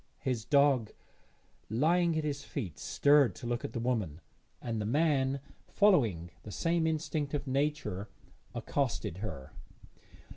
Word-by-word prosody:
His 125 Hz, -6 st, -2 dB
dog 140 Hz, -5 st, +4 dB, 0.8 s
lying 165 Hz, +8 st, +2 dB
at 155 Hz, -, 0 dB
his 145 Hz, -1 st, -2 dB
feet 105 Hz, -, -5 dB
stirred 145 Hz, -3 st, +4 dB
to -, -, -9 dB
look 120 Hz, 0 st, -2 dB
at -, -, -5 dB
the -, -, -2 dB
woman, 110 Hz, -11 st, -1 dB, 0.4 s
and 115 Hz, -3 st, -3 dB
the -, -, -2 dB
man, 140 Hz, 0 st, +2 dB, 0.3 s
following 115 Hz, -, +3 dB
the 105 Hz, -, -10 dB
same 165 Hz, -, +1 dB
instinct 155 Hz, -2 st, -1 dB
of 145 Hz, 0 st, -3 dB
nature, 135 Hz, -8 st, -1 dB, 0.5 s
accosted 115 Hz, -, -1 dB
her. 70 Hz, -11 st, -6 dB
135 Hz, 135 wpm, -31 LUFS, 110-150 Hz, 0.8 s, dog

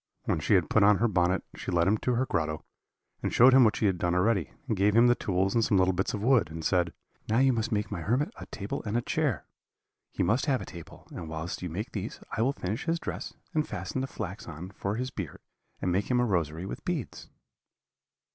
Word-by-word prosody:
When -, -, 0 dB
she 90 Hz, +6 st, +3 dB
had 90 Hz, -5 st, +3 dB
put 105 Hz, -, +3 dB
on 100 Hz, 0 st, +6 dB
her 120 Hz, -, +2 dB
bonnet 90 Hz, -2 st, +1 dB
she -, -, -6 dB
led 85 Hz, -1 st, +3 dB
him 105 Hz, +2 st, +3 dB
to 125 Hz, -, 0 dB
her 130 Hz, +3 st, +1 dB
grotto, 80 Hz, -7 st, -2 dB, 0.6 s
and -, -, -1 dB
showed 125 Hz, +2 st, +7 dB
him 130 Hz, -1 st, +8 dB
what 110 Hz, -2 st, +4 dB
she -, -, 0 dB
had 95 Hz, -3 st, +1 dB
done 90 Hz, 0 st, +1 dB
already, 95 Hz, -1 st, +2 dB, 0.2 s
and 115 Hz, -, 0 dB
gave 100 Hz, +2 st, +2 dB
him 115 Hz, +1 st, +7 dB
the 120 Hz, -, +6 dB
tools 95 Hz, -4 st, 0 dB
and 115 Hz, -, +3 dB
some 105 Hz, -, +3 dB
little 95 Hz, 0 st, +3 dB
bits 95 Hz, +5 st, -1 dB
of 100 Hz, -, -5 dB
wood, 120 Hz, -, +4 dB
and 80 Hz, 0 st, -6 dB
said, 90 Hz, -3 st, +2 dB, 0.4 s
'Now 110 Hz, -, +2 dB
you 130 Hz, 0 st, +5 dB
must 115 Hz, -1 st, -1 dB
make 105 Hz, -1 st, -1 dB
my 95 Hz, -5 st, -3 dB
hermit 130 Hz, -, 0 dB
a -, -, -9 dB
table 100 Hz, -1 st, -5 dB
and 110 Hz, +1 st, -1 dB
a 120 Hz, -, -1 dB
chair 135 Hz, -, -1 dB, 0.7 s
he -, -, -1 dB
must 115 Hz, +7 st, +1 dB
have 135 Hz, -3 st, +2 dB
a -, -, -6 dB
table; 85 Hz, -2 st, -11 dB
and 80 Hz, -2 st, -7 dB
whilst 80 Hz, +2 st, -5 dB
you 90 Hz, -, -3 dB
make 105 Hz, +10 st, -4 dB
these 105 Hz, +1 st, -5 dB, 0.2 s
I 110 Hz, -, 0 dB
will 130 Hz, +4 st, +3 dB
finish 110 Hz, -3 st, -4 dB
his 165 Hz, +1 st, +1 dB
dress, -, -, -5 dB, 0.2 s
and 155 Hz, -1 st, +1 dB
fasten 130 Hz, -, -3 dB
the 135 Hz, -, -2 dB
flax 105 Hz, -5 st, -6 dB
on 85 Hz, +3 st, -7 dB
for 100 Hz, +1 st, -3 dB
his 130 Hz, +3 st, -3 dB
beard, 95 Hz, -, -6 dB, 0.5 s
and 90 Hz, -, +1 dB
make 95 Hz, +3 st, 0 dB
him 125 Hz, -1 st, +3 dB
a 125 Hz, -, +3 dB
rosary 85 Hz, -4 st, -1 dB
with -, -, -6 dB
beads.' 160 Hz, -, -4 dB
105 Hz, 245 wpm, -29 LUFS, 90-120 Hz, 0.7 s, him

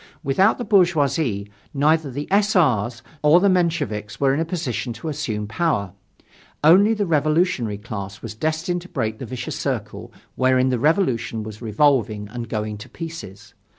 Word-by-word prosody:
Without 185 Hz, +10 st, +3 dB
the 245 Hz, -, -4 dB
bourgeoisie 150 Hz, -, +2 dB, 0.2 s
neither 155 Hz, +1 st, +2 dB
the 140 Hz, +3 st, -5 dB
S. 205 Hz, +1 st, +3 dB
R.'s 120 Hz, -, +2 dB, 0.2 s
nor 150 Hz, +4 st, +6 dB
the 200 Hz, +2 st, +3 dB
Mensheviks 155 Hz, -, -1 dB
were 135 Hz, -1 st, +3 dB
in 140 Hz, -, 0 dB
a 165 Hz, -, 0 dB
position 125 Hz, -, -3 dB
to 120 Hz, +8 st, -6 dB
assume 110 Hz, -7 st, -3 dB
power. 110 Hz, -, -1 dB, 0.7 s
Only 195 Hz, +8 st, +6 dB
the 210 Hz, -1 st, 0 dB
revolutionary 155 Hz, -, +1 dB
class 100 Hz, -2 st, -7 dB
was 115 Hz, -2 st, -6 dB
destined 160 Hz, +8 st, -2 dB
to 180 Hz, -, -13 dB
break 110 Hz, -6 st, -3 dB
the 130 Hz, -, -6 dB
vicious 125 Hz, 0 st, -5 dB
circle -, -, -4 dB, 0.2 s
wherein 130 Hz, 0 st, +3 dB
the 125 Hz, -2 st, 0 dB
Revolution 125 Hz, -, +1 dB
was 110 Hz, 0 st, -9 dB
revolving 110 Hz, -3 st, +1 dB
and 115 Hz, 0 st, -6 dB
going 105 Hz, -2 st, -3 dB
to -, -, -10 dB
pieces. 160 Hz, -, -9 dB
135 Hz, 160 wpm, -22 LUFS, 110-165 Hz, 0.7 s, nor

